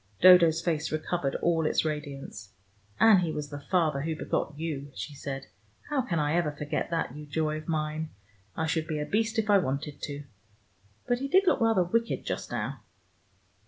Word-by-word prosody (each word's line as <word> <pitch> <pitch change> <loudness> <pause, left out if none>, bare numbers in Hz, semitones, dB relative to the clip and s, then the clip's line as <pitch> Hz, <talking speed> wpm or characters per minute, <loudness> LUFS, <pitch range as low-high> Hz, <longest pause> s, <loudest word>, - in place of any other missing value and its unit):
Dodo's 170 -3 +7
face 160 -3 -1
recovered 155 -2 -1
all 165 -2 +2
its - - +1
radiance. 140 -8 -5 0.5
"And 220 -4 +7
he 170 -3 -1
was 150 -1 -5
the 145 - -5
father 155 -3 +1
who 160 +2 -2
begot 150 -1 -2
you," 145 -3 -4
she 105 +9 -6
said. 135 -1 -5 0.5
"How 285 -3 +2
can 185 -9 -2
I 150 0 +1
ever 170 -3 +1
forget 150 +1 -3
that, 165 -6 -2
you 150 0 -9
joy 155 +1 -1
of 155 - -9
mine? 155 -1 -2 0.5
I 160 - 0
should 160 0 -1
be 155 -2 -2
a 150 - -2
beast 225 +4 0
if 220 -1 +1
I 205 -1 +6
wanted 140 -2 -3
to. 145 0 -5 0.8
But 245 0 +1
he 275 - -2
did 380 +7 +4
look 345 - +3
rather 225 -5 +4
wicked 230 +6 -1
just - - -4
now. 120 +2 -3
155 Hz, 190 wpm, -28 LUFS, 145-175 Hz, 0.8 s, Dodo's